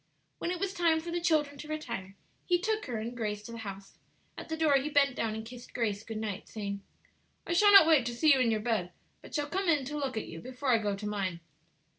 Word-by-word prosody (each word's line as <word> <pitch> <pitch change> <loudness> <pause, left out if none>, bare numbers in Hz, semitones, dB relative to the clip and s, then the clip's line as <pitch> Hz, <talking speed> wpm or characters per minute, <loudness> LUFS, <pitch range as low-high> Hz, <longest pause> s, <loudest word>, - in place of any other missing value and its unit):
When - - -2
it 360 -1 -2
was 390 0 -1
time 335 -4 +3
for 340 +1 -6
the 345 0 -1
children 295 -4 +1
to 300 - -8
retire, 195 -11 -5 0.3
he 355 - +4
took 430 +1 -1
her 240 -3 -3
and 230 +3 -5
Grace 210 -3 -3
to 230 - -9
the 230 - -7
house. 195 -2 -8 0.4
At - - -9
the 320 - -2
door 315 -2 +3
he 275 +3 -1
bent 280 -3 +3
down 220 -3 -1
and 220 0 -6
kissed 240 +1 -11
Grace 215 -4 -1
good 225 -1 -6
night, 215 -2 -4
saying, 200 -2 -4 0.6
"I - - -1
shall 410 +4 +6
not 395 -5 +10
wait 305 -7 +4
to 240 - -3
see 305 +4 +5
you 270 - +2
in 250 -2 +3
your 220 -1 +1
bed, 210 -6 -1 0.3
but - - -10
shall 295 -2 0
come 375 +3 -1
in 295 -5 +3
to 295 +3 -5
look 270 -5 -2
at 220 - -2
you 165 0 -9
before 255 +2 -4
I 235 -3 +5
go 205 -2 -1
to 205 +1 -7
mine." 195 -4 -2
250 Hz, 260 wpm, -30 LUFS, 215-315 Hz, 0.6 s, not